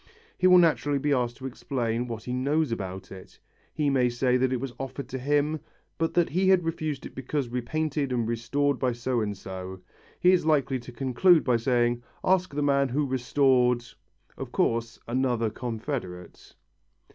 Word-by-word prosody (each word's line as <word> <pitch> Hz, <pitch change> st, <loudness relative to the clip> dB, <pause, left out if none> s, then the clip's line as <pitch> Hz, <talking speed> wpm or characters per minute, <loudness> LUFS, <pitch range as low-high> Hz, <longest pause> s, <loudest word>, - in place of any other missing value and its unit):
He 185 Hz, -, +3 dB
will 180 Hz, 0 st, +8 dB
naturally 155 Hz, -4 st, +3 dB
be 145 Hz, +1 st, +1 dB
asked 120 Hz, -2 st, -1 dB
to 130 Hz, -, -9 dB
explain 120 Hz, -2 st, -2 dB
what 115 Hz, -2 st, -6 dB
he 125 Hz, -, -4 dB
knows 140 Hz, +3 st, 0 dB
about 95 Hz, -3 st, -5 dB
it. 95 Hz, -1 st, -12 dB, 0.3 s
He 145 Hz, -2 st, 0 dB
may 125 Hz, -2 st, +3 dB
say 125 Hz, +1 st, +1 dB
that 130 Hz, 0 st, +2 dB
it 130 Hz, -, 0 dB
was 130 Hz, -1 st, -5 dB
offered 135 Hz, 0 st, -5 dB
to 130 Hz, -, -4 dB
him, 145 Hz, +3 st, +1 dB, 0.4 s
but 165 Hz, 0 st, -1 dB
that 175 Hz, -1 st, +3 dB
he 185 Hz, +4 st, +2 dB
had 185 Hz, -3 st, +4 dB
refused 155 Hz, -4 st, -3 dB
it -, -, -9 dB
because 135 Hz, 0 st, -3 dB
repainted 140 Hz, +3 st, -2 dB
and 120 Hz, -3 st, 0 dB
restored 140 Hz, +4 st, 0 dB
by 125 Hz, -2 st, +1 dB
so 120 Hz, 0 st, -1 dB
and 105 Hz, -2 st, -3 dB
so. 95 Hz, 0 st, -7 dB, 0.4 s
He 180 Hz, -, +5 dB
is 185 Hz, -, +3 dB
likely 140 Hz, -4 st, +1 dB
to 125 Hz, +1 st, -11 dB
conclude 135 Hz, +7 st, +3 dB
by 125 Hz, -2 st, +2 dB
saying, 120 Hz, 0 st, +1 dB, 0.2 s
"Ask 185 Hz, -2 st, +2 dB
the 145 Hz, -, 0 dB
man 140 Hz, -1 st, +2 dB
who 145 Hz, +4 st, 0 dB
restored 125 Hz, -2 st, +2 dB, 0.3 s
" -, -, -37 dB
of -, -, -6 dB
course, 115 Hz, 0 st, 0 dB
another 120 Hz, -2 st, 0 dB
confederate. 110 Hz, -, -6 dB
130 Hz, 180 wpm, -27 LUFS, 120-145 Hz, 0.4 s, will